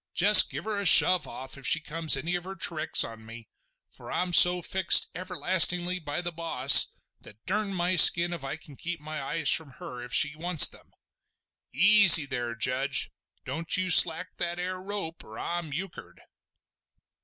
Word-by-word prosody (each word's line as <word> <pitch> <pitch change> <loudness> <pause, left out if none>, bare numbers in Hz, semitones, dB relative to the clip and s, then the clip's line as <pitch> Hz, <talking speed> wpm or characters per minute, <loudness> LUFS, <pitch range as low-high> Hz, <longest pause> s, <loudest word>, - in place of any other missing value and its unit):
Jest 205 +4 +6
give - - -10
her 210 -2 -6
a 200 - -7
shove 180 +2 +5
off 130 +1 -11
if 135 - -4
she 160 - +1
comes 160 -1 -2
any 165 +6 -7
of 175 -1 -5
her 190 +1 -11
tricks 165 -3 -2
on 115 -1 -12
me, 115 0 -15 0.4
for - - -15
I'm 180 -1 -5
so 180 0 +4
fixed 190 0 +1
everlastingly 180 0 -1
by 150 +1 -7
the 175 - -5
boss, 155 -5 +4 0.3
that 105 +2 -20
durn 205 +1 -4
my 180 0 -2
skin 170 +2 +5
if 170 -5 -10
I 135 +1 -7
can 150 -3 -19
keep 175 +4 -9
my 155 0 -10
eyes 150 +3 -3
from 150 -5 -1
her 125 -8 -13
if 125 0 -13
she 145 0 +1
wants 165 0 +4
them! - - -18 0.8
Easy 200 -7 +5
there, 120 -3 -7
Judge! 130 +3 -2 0.3
don't 165 +2 -5
you 185 0 -4
slack 165 +1 +3
that 175 0 -6
ar 185 +1 -8
rope 195 -5 -8
or 110 - -16
I'm 170 -3 -8
euchered!" 185 +7 -11
170 Hz, 180 wpm, -24 LUFS, 145-180 Hz, 0.8 s, Jest